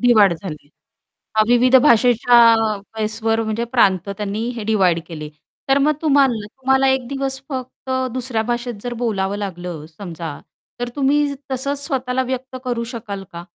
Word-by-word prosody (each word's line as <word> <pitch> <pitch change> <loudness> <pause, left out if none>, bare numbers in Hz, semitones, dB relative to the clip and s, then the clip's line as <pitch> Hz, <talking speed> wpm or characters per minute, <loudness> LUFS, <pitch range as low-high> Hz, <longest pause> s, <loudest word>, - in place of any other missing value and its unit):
Divide 220 -6 +5
झाले. 150 -6 -8 0.7
अ, 215 - +5
विविध 245 +2 +4
भाषेच्या 240 -1 +5 0.6
बेसवर 225 +1 0
म्हणजे 220 +1 -2
प्रांत 195 -6 +3
त्यांनी 205 +3 -3
हे 225 - -5
डिव्हाईड 190 -6 +2
केले 155 -3 -7 0.4
तर 270 - +5
मग 295 +2 +3
तुम्हा 285 -3 +5
तुम्हाला 265 +4 0
1 265 -2 0
दिवस 270 0 -2
फक्त 260 -1 -7 0.2
दुसऱ्या 250 -3 -2
भाषेत 240 +1 -2
जर 245 -1 -3
बोलावं 200 -4 -1
लागलं 175 -5 -5
समजा, 165 -3 -7 0.4
तर 245 0 -2
तुम्ही 285 +1 +2 0.2
तसंच 280 +2 -1
स्वतःला 260 -3 -1
व्यक्त 260 0 -5
करू 240 -2 -2
शकाल 205 -4 -6
का? 170 0 -7
235 Hz, 145 wpm, -20 LUFS, 200-260 Hz, 0.7 s, डिव्हाईड